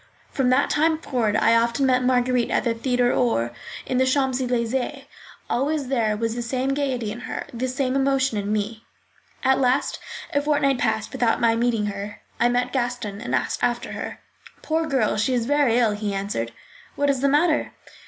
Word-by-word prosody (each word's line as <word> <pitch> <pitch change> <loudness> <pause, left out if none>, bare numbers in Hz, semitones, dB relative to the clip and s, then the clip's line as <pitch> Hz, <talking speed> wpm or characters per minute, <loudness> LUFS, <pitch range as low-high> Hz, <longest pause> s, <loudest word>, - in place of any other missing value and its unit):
From 265 -2 +1
that 255 +3 +3
time 315 +1 +2
forward, 240 -9 -1
I 230 +1 +4
often 235 +4 +2
met 255 -1 +3
Marguerite 250 -1 +2
at - - +1
the 235 - +1
theatre 245 +1 +1
or 120 - +1 0.3
in 255 - 0
the 260 - +4
Champs 265 -1 +1
Elysées. 250 +3 -1 0.4
Always 280 +1 -1
there 225 -5 +1
was 225 0 -1
the 240 - -3
same 255 +3 -1
gaiety 260 -6 -1
in 225 - -6
her, 255 - -5
the 245 +2 -2
same 255 0 -1
emotion 270 -4 +1
in 200 +1 -3
me. 215 +1 -2 0.6
At 265 0 +3
last 255 +1 +1 0.3
a 285 - +2
fortnight 285 -3 +1
passed 220 -2 0
without 245 -4 +1
my 230 -1 +3
meeting 230 -2 +1
her. 205 0 -5 0.2
I 240 - +4
met 245 +1 0
Gaston 240 -5 -2
and 125 - -1
asked 125 - -2
after 240 0 0
her. - - -6 0.4
"Poor 320 +1 0
girl, 260 -9 +1
she 255 +4 +1
is 235 -2 0
very 280 -3 +3
ill," 235 -3 +3
he 205 -1 -3
answered. 195 - -3 0.4
"What 285 0 +2
is 270 - -2
the 280 - +3
matter?" 300 +3 +2
245 Hz, 190 wpm, -23 LUFS, 225-270 Hz, 0.6 s, I